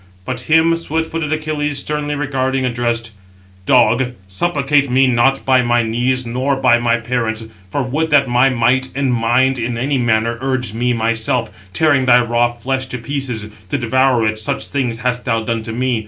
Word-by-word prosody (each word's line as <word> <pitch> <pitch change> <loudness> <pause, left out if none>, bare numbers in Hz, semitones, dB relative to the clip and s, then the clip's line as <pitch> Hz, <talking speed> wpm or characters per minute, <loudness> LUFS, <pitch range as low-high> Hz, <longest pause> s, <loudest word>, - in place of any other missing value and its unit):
But 125 +1 -3
him 160 +1 +4
swift 160 -1 -3
footed 165 -2 -3
Achilles, 155 -2 -2
sternly 150 +1 -2
regarding, 135 -2 -1
addressed; 120 -2 -2 0.6
"Dog, 125 0 +3
supplicate 140 - 0
me 130 +2 +4
not 130 +2 +2
by 130 -1 +4
my 120 -1 +2
knees, 125 +3 -1
nor 130 +4 -1
by 125 -3 +3
my 120 0 +1
parents; 115 -1 -2 0.2
for 140 +8 -1
would 150 +6 -1
that 140 -3 +4
my 125 +2 +3
might 130 +1 +1
and 135 -2 0
mind 120 +3 +2
in 115 0 -2
any 135 +3 0
manner 115 0 0
urge 130 -4 -2
me 120 +2 0
myself, 115 -1 0 0.2
tearing 145 - +2
thy 125 0 +6
raw 120 0 +1
flesh 130 +2 -3
to 125 - -5
pieces, 125 -3 -4 0.2
to - - 0
devour 130 -1 +2
it, 110 0 -1
such 110 - -2
things 125 -5 -2
hast 125 0 0
thou 115 -3 0
done 115 0 -2
to 110 - -6
me. 125 0 -1
125 Hz, 180 wpm, -17 LUFS, 120-135 Hz, 0.6 s, thy